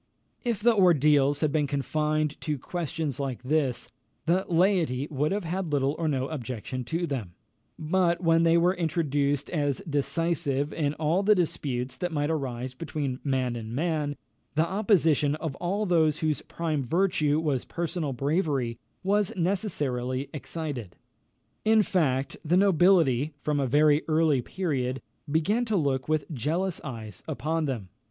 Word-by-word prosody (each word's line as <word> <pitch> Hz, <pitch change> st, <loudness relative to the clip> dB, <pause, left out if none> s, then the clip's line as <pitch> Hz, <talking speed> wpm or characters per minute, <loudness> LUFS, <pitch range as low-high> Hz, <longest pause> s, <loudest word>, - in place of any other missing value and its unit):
If 235 Hz, -4 st, -1 dB
the 235 Hz, -1 st, +5 dB
ordeals 150 Hz, -6 st, +4 dB
had 155 Hz, -2 st, +2 dB
been 150 Hz, -1 st, +1 dB
confined 150 Hz, +2 st, -1 dB
to 150 Hz, -2 st, -2 dB
questions 155 Hz, -2 st, -3 dB
like 135 Hz, -3 st, -3 dB
this, 135 Hz, -2 st, 0 dB, 0.4 s
the 180 Hz, +3 st, +2 dB
laity 170 Hz, -7 st, +2 dB
would 150 Hz, +2 st, 0 dB
have 200 Hz, 0 st, -1 dB
had 175 Hz, 0 st, -3 dB
little 140 Hz, 0 st, +1 dB
or 165 Hz, -, 0 dB
no 135 Hz, -3 st, 0 dB
objection 125 Hz, -3 st, -5 dB
to 165 Hz, +6 st, -1 dB
them; 115 Hz, -, -4 dB, 0.4 s
but 170 Hz, +2 st, +1 dB
when 165 Hz, -2 st, +3 dB
they 165 Hz, 0 st, +4 dB
were 175 Hz, +2 st, +4 dB
introduced 145 Hz, -5 st, 0 dB
as 145 Hz, -5 st, 0 dB
decisive 145 Hz, -1 st, 0 dB
in 150 Hz, -2 st, -1 dB
all 160 Hz, +5 st, +1 dB
the 210 Hz, +1 st, +5 dB
disputes 135 Hz, -8 st, -2 dB
that 175 Hz, -1 st, -2 dB
might 145 Hz, 0 st, 0 dB
arise 130 Hz, -4 st, -3 dB
between 140 Hz, -2 st, -4 dB
man 130 Hz, -3 st, 0 dB
and 115 Hz, 0 st, -6 dB
man, 150 Hz, -1 st, -1 dB, 0.4 s
the 155 Hz, +2 st, +3 dB
opposition 165 Hz, -7 st, +2 dB
of 155 Hz, -2 st, -4 dB
all 200 Hz, +5 st, -1 dB
those 160 Hz, -5 st, +3 dB
whose 155 Hz, -4 st, 0 dB
prime 155 Hz, -4 st, -2 dB
virtue 155 Hz, 0 st, +2 dB
was 145 Hz, -6 st, 0 dB
personal 170 Hz, -3 st, -3 dB
bravery, 135 Hz, -3 st, -1 dB, 0.2 s
was 205 Hz, +2 st, +2 dB
necessarily 145 Hz, -, -1 dB
excited. 135 Hz, -, -5 dB, 0.7 s
In 220 Hz, 0 st, +5 dB
fact, 140 Hz, -8 st, 0 dB
the 170 Hz, +3 st, +2 dB
nobility, 170 Hz, -7 st, +4 dB
from 150 Hz, -1 st, 0 dB
a 135 Hz, -, +1 dB
very 150 Hz, +3 st, +4 dB
early 155 Hz, -4 st, +3 dB
period, 135 Hz, -5 st, -2 dB, 0.3 s
began 200 Hz, +10 st, +2 dB
to 220 Hz, -2 st, -1 dB
look 140 Hz, -5 st, 0 dB
with 155 Hz, -2 st, +1 dB
jealous 165 Hz, +8 st, -1 dB
eyes 110 Hz, -8 st, -7 dB
upon 155 Hz, +1 st, -1 dB
them. 115 Hz, -10 st, -4 dB
150 Hz, 150 wpm, -27 LUFS, 135-170 Hz, 0.7 s, the